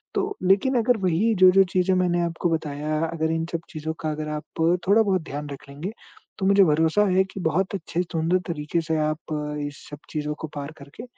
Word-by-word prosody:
तो, 400 0 -1
लेकिन 200 +8 +3
अगर 240 +1 +2
वही 185 +6 +2
जो-जो 185 0 +7
चीज़ें 185 0 +3
मैंने 175 -1 +2
आपको 170 +1 -1
बताया 155 -1 -2
अगर 160 -1 -1
इन 165 0 -1
सब 165 - -1
चीज़ों 160 0 -4
का 155 - -1
अगर 155 0 -4
आप - - -14 0.4
थोड़ा-बहुत 200 -3 +4
ध्यान 145 +1 -5
रख 140 0 -9
लेंगे, 150 +8 -5 0.5
तो 190 - -1
मुझे 200 0 +6
भरोसा 160 +6 +3
है 190 - +5
कि - - -6
बहुत 190 +5 0
अच्छे 175 -1 -2
सुंदर 165 +1 0
तरीके 165 0 -2
से 160 - +2
आप 155 0 -6 0.3
इस 145 - -11
सब 145 - -8
चीज़ों 150 -1 -2
को 160 - -4
पार 145 +1 -5
करके 140 +10 -11
165 Hz, 200 wpm, -24 LUFS, 155-190 Hz, 0.5 s, जो-जो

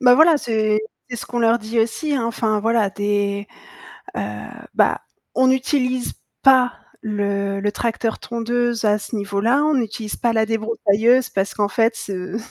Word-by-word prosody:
Bah 250 -2 +7
voilà, 315 +3 +6
c'est 215 -5 0 0.3
c'est 245 - -4
ce - - -7
qu'on 245 - -3
leur 230 0 +3
dit 225 +1 -3
aussi 290 +7 -1
hein, 255 -4 0
enfin 220 -2 0
voilà, 225 -1 +2
des 205 0 -1 0.7
heu - - -1 0.5
bah, - - +2 0.3
on 260 0 +3
n'utilise 255 -1 +1 0.3
pas 260 -2 +5 0.3
le 200 -2 -1
le 205 +1 0
tracteur 225 0 -2
tondeuse 235 0 -1
à 210 0 +3
ce 210 - -6
niveau-là, 205 +7 +1
on 305 0 +2
n'utilise 220 -3 -3
pas 235 -1 +1
la 220 -1 +2
débroussailleuse 225 +2 +2
parce 195 0 -1
qu'en 205 -1 +1
fait, 225 +3 +2
heu 185 +1 -4
225 Hz, 165 wpm, -21 LUFS, 205-245 Hz, 0.7 s, Bah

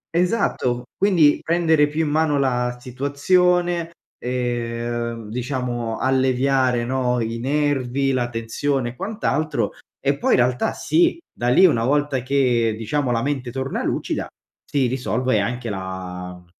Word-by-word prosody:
Esatto. 170 - +1
Quindi 175 -7 +4
prendere 160 -3 +3
più 155 +2 -1
in 145 - -1
mano 155 -2 +2
la 125 -2 0
situazione, 170 +7 +1 0.3
ehm, 120 -2 -3
diciamo 120 -2 -3
alleviare, 130 -1 +2
no, 125 -1 0
i 115 0 -2
nervi, 135 0 0
la 120 -2 0
tensione 120 +3 -2
e 120 - -10
quant'altro. 155 - -1 0.3
E, 140 0 0
poi - - +1
in - - +5
realtà 125 0 +1
sì, 340 +1 +2 0.2
da 120 - -2
lì 185 +10 +6
una 115 -10 +3
volta 145 -1 +1
che 125 -4 +1
diciamo 125 +5 -1
la 115 -1 0
mente 135 -4 -2
torna 135 +2 -3
lucida - - -2 0.4
si 140 -3 0
risolve 125 -2 0
anche 120 +3 -2
la 90 -2 -6
mhmm, 90 - -17
130 Hz, 135 wpm, -22 LUFS, 120-145 Hz, 0.4 s, lì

